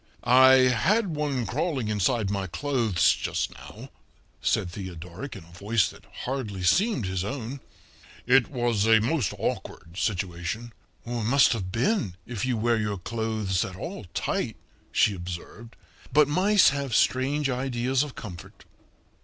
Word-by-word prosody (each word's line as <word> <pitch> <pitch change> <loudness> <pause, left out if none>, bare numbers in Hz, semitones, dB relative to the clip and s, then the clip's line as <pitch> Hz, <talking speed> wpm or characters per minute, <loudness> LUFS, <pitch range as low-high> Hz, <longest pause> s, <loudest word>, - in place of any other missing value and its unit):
"I 130 0 +6
had 185 - +1
one 145 -5 -1
crawling 130 - -1
inside 105 0 +1
my 100 -2 -2
clothes 115 -3 +2
just - - -2
now," - - -11 0.5
said 90 - 0
Theodoric 90 - -7
in - - -9
a 85 - -18
voice 100 +3 +1
that - - -15 0.2
hardly 115 -8 -3
seemed 180 - +2
his 95 -1 -2
own. 130 +3 -5 0.7
"It 125 0 +5
was 120 -5 0
a 115 -1 +6
most 120 - 0
awkward 85 +2 -4
situation." 95 +3 -3 0.3
"It 120 - -7
must 135 +4 +5
have 95 -5 -4
been, 115 - 0
if 120 +1 -3
you 125 -3 0
wear 115 +1 +2
your 105 -2 -2
clothes 110 -2 -1
at 95 - -6
all 165 - -7
tight," - - -1 0.4
she 105 - +3
observed. 90 +6 -8 0.4
"But 150 +2 +5
mice 190 +6 +5
have 140 -4 -2
strange 135 +4 +2
ideas 130 0 0
of 145 -3 -4
comfort." 90 -7 -10
115 Hz, 145 wpm, -26 LUFS, 100-135 Hz, 0.7 s, I